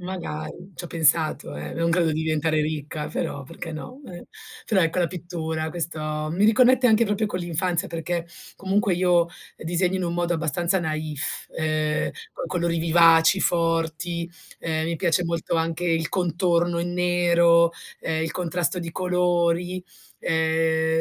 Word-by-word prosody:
Magari. 180 - -6
Ci 175 - -5
ho - - -4
pensato, 155 - +1
eh. 75 0 -6
Non 165 0 0
credo 170 -2 +2
di 155 - -1
diventare 155 0 +1
ricca, 150 0 -3
però, 140 - -3
perché 165 +3 -8
no. 250 - -8
Eh. 175 -1 -10 0.4
Però, 195 -4 +2
ecco 165 +2 +1
la 175 - +3
pittura 160 -2 -4
questo 155 -2 -3
mi 185 +5 +1
riconnette 250 +3 +5
anche 225 0 +4
proprio 210 +1 0
con 180 -3 -3
l'infanzia 175 +2 0
perché 170 +1 -3 0.3
comunque 195 0 0
io 175 -1 +3 0.3
disegno 175 +3 0
in 185 - -2
un 170 0 -2
modo 175 0 0
abbastanza 170 +4 +1
naif, 155 -3 -2
ehm, 155 -1 -1 0.2
con - - -5
colori 170 -1 -1
vivaci, 165 +2 +5
forti, 170 0 0 0.3
ehm, 160 -1 -1
mi 170 - -1
piace 170 +3 +1
molto 170 0 -2
anche 165 +1 -1
il 165 -1 +1
contorno 175 -1 +1
in 175 +1 -2
nero, 170 -1 +4 0.3
ehm, 160 0 -1
il 160 - -1
contrasto 175 0 -1
di 170 -2 -5
colori, 180 0 0 0.4
ehm 160 0 +1
170 Hz, 155 wpm, -24 LUFS, 160-180 Hz, 0.4 s, riconnette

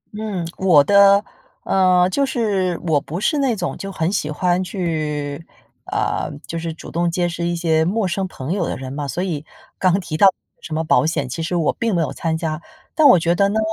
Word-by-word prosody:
嗯， 210 -5 -3
我 175 -7 +5
的 200 +3 +5 0.4
呃， 185 -1 +3
就 280 - +1
是， 205 -9 0
我 155 -4 +2
不 165 +6 -6
是 290 +8 +1
那 265 -4 +1
种 180 -4 -3
就 195 - -6
很 170 0 -1
喜 155 -6 -1
欢 175 +4 0
去 155 -5 -3 0.5
呃， - - -1 0.2
就 165 - -4
是 165 0 -4
主 160 - -10
动 170 +1 0
结 175 +1 0
识 170 0 -4
一 175 - -1
些 160 -2 +2
陌 195 +4 0
生 190 +2 -2
朋 140 -5 -6
友 190 -3 -1
的 - - -3
人 130 0 -7
嘛。 145 0 -4
所 155 +8 -3
以 160 -6 -3 0.4
刚 185 0 +3
提 170 -4 -5
到 195 +5 +6 0.3
什 155 - -6
么 160 - 0
保 165 - +3
险， 160 -4 -1
其 130 +6 -5
实 170 +2 -2
我 165 -3 +1
并 230 -4 -1
没 170 - +2
有 - - -4
参 160 -1 -2
加。 160 -1 -3 0.3
但 310 -2 +5
我 185 - +8
觉 170 0 +1
得 200 +3 +2
呢， 220 - 0
175 Hz, 235 characters per minute, -20 LUFS, 160-195 Hz, 0.5 s, 我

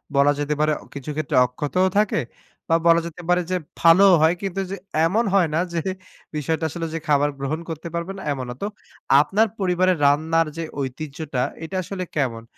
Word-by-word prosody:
বলা 140 +1 +5
যেতে 145 +1 0
পারে 155 0 +3 0.2
কিছু 140 +1 -7
ক্ষেত্রে 155 -3 -2
অক্ষতও 150 +9 0
থাকে 210 -1 +2 0.5
বা 165 - +4
বলা 170 0 +6
যেতে 170 +2 -10
পারে 180 0 +4
যে 185 - +2 0.2
ভালোও 180 +3 +7
হয়, 160 +3 +4
কিন্তু 195 -1 -3
যে 195 - -3 0.3
এমন 215 +7 +2
হয় 180 -5 +4
না - - +2
যে 165 - 0 0.5
বিষয়টা 160 +2 -1
আসলে 165 +1 -4
যে 165 - -2
খাবার 145 0 +3
গ্রহণ 140 +4 -2
করতে 165 +1 -5
পারবে 170 +3 -3
না, - - -8
এমন 130 -2 -5
না। 125 - -5
তো 200 - -1 0.5
আপনার 215 +8 +2
পরিবারের 185 -1 +2
রান্নার 160 +3 +3
যে 165 - -2 0.2
ঐতিহ্যটা 140 0 -4 0.2
এটা 190 +4 -6
আসলে 185 +1 -5
কেমন? 120 -6 -1
165 Hz, 185 wpm, -22 LUFS, 145-180 Hz, 0.5 s, ভালোও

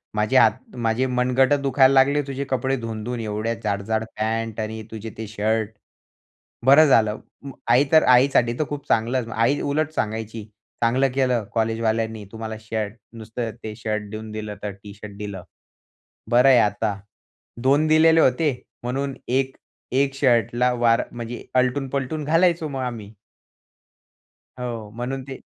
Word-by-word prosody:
माझे 105 +4 +2
हात 235 - +2
माझे 115 +1 0
मनगटं 130 +3 +2
दुखायला 135 -1 +4
लागले 140 +2 +4
तुझे 140 0 -3
कपडे 135 +1 0
धुवून-धुवून 115 0 -5
एवढे 110 +1 -2
जाड-जाड 110 +2 -1
पॅन्ट 115 0 -2
आणि 110 0 -4
तुझे 110 0 -6
ते 110 0 -5
शर्ट, 110 0 -1 1.0
बरं 145 +4 +8
झालं." 110 -4 +3 0.2
मग 140 -2 -9
आई 125 +4 +6
तर 160 - +7
आईसाठी 125 -2 +4
तर 155 - +1
खूप 145 -1 -6
चांगलंच 115 +1 +1
आई 115 +6 +2
उलट 150 +2 -1
सांगायची, 110 -1 -3 0.4
"चांगलं 130 +4 +3
केलं 125 -4 +1
कॉलेजवाल्यांनी 110 -1 -1
तुम्हाला 110 -1 -6
शर्ट 110 -1 -4 0.2
नुसतं 115 +1 -5
ते 110 -1 -6
शर्ट 105 -2 -3
देऊन 110 0 -7
दिलं 105 -1 -5
तर 105 - -3
टी 100 -1 -10
शर्ट 105 -1 -10
दिलं, 100 -3 -6 0.9
बरं 125 +2 +5
आहे 130 -2 +7
आता." 105 -1 0 0.6
2 140 +4 +3
दिलेले 160 +1 +5
होते 145 +1 +2 0.3
म्हणून 135 +3 -2
1 130 +1 0 0.4
1 135 +1 +1
शर्टला 125 -2 +2
वार 120 -1 +3
म्हणजे 120 0 -7
आलटून-पलटून 135 +3 0
घालायचो 165 +1 +2
मग 135 -2 -4
आम्ही. 115 -5 -5 1.5
हो, 115 -4 -5
म्हणून 130 +3 -4
ते 135 -1 -7
120 Hz, 145 wpm, -23 LUFS, 110-135 Hz, 1.5 s, बरं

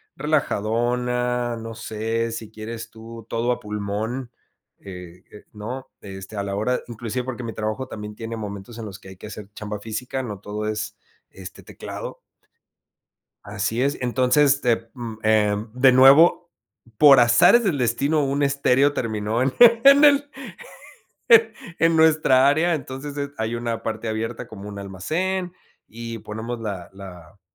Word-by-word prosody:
relajadona, 125 -3 -1
no 115 0 -7
sé, 115 0 -3
si 110 -1 -7
quieres 110 +1 -7
tú, 115 0 -11
todo 120 +2 0
a - - -7
pulmón, 105 +4 -4 0.5
eh, 90 -2 -11
eh, 105 - -14
¿no?, 120 +5 -7
este, 95 +1 -9
a 100 - -2
la 100 0 -4
hora 125 +5 -1
inclusive 120 +1 -4
porque 125 -1 -6
mi 115 - -5
trabajo 110 +4 -3
también 105 -2 -8
tiene 115 +1 -6
momentos 105 +1 -7
en 110 - -6
los 100 -1 -9
que 95 - -14
hay 95 - -12
que 105 - -10
hacer 105 -1 -9
chamba 105 0 -6
física, 120 +5 -4
no 105 -5 -6
todo 105 +1 -5
es, 110 -1 -4 0.3
este, 95 -1 -11
teclado. - - -8 1.3
Así 105 +4 -2
es, 140 +2 0
entonces, 130 +3 +3
te 115 -1 0
mm, 120 -3 -7
em, 105 0 +2
de 130 +1 +5
nuevo, 145 +7 +6 0.5
por 140 -3 +8
azares 120 - +6
del 175 -8 0
destino, 140 +5 +1
un 140 +1 0
estéreo 140 0 +2
terminó 110 0 -2
en 130 0 +1
en 245 +5 +7
el 285 -1 +5 1.5
en 165 0 +3
nuestra 155 -5 +4
área. 160 +4 +3
Entonces, 140 0 -7
es 140 0 -3
hay 110 +1 -2
una 115 -1 -3
parte 110 0 -4
abierta 115 +1 -4
como 105 -1 -10
un 100 -1 -7
almacén, 175 - -3 0.3
y 115 0 -7
ponemos 110 +3 -6
la 100 -6 -6
la 90 -2 -12
115 Hz, 155 wpm, -23 LUFS, 105-130 Hz, 1.5 s, por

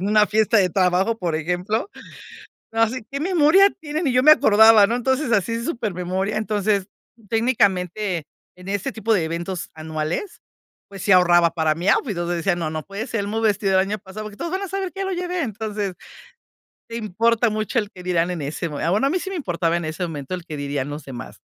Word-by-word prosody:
En 190 - -2
una 210 0 +4
fiesta 220 +1 +3
de 190 -2 +3
trabajo, 185 +4 +1
por 175 -5 -2
ejemplo, 180 - -1 0.8
así 225 +1 0
que 280 - -4
memoria 355 +3 +5
tienen. 310 +2 -3
Ni 270 - +1
yo 250 - +3
me 305 - +7
acordaba, 220 -7 +7
¿no? 230 - -1
Entonces 260 +2 0
así 215 +1 +1
s 230 0 -3
supermemoria. 195 - -2
Entonces, 210 -2 0 0.4
técnicamente, 200 - 0 0.3
en 180 +1 -12
ese 205 +6 -2
tipo 225 -2 -1
de 180 -6 +2
eventos 170 +2 -4
anuales, 160 - -4 0.5
pues 195 -1 -10
sí 200 - -1
ahorraba 175 -2 +5
para 160 -2 +1
mí 175 +4 -3
outfit, 215 -8 +2
o 175 - -2
sea, 175 0 -1
decía: 175 +2 +1
"No, 165 -2 -2
no 155 0 -4
puede 200 +6 -6
ser 230 -5 -2
el 200 - -3
mismo 220 +2 -2
vestido 200 -3 +1
el 190 - +5
año 210 +1 -2
pasado, 205 +2 -9
porque 210 -1 -10
todos 340 - -4
van 375 - -1
a 395 - -4
saber 385 0 -3
que 390 - -8
ya 390 - -1
lo 385 - -2
llevé". 360 0 -2
Entonces, 210 -4 -3 0.9
te 230 - -6
importa 230 +2 +1
mucho 215 +3 -1
el 210 -3 -1
qué 180 - -11
dirán 175 -1 0
en 170 -4 -5
ese 150 +4 -3
mome 150 -1 -4
ah, 165 - +1
bueno, 210 +8 +2
a - - -2
mí 365 - +1
sí 380 - -6
me 385 - -4
importaba 170 - -1
en 175 - -3
ese 155 +3 -5
momento 155 -1 -5
el 180 -2 -6
qué 155 - -7
dirían 140 -1 -3
los 145 0 -7
demás. 130 -4 -9
205 Hz, 225 wpm, -22 LUFS, 175-230 Hz, 0.9 s, me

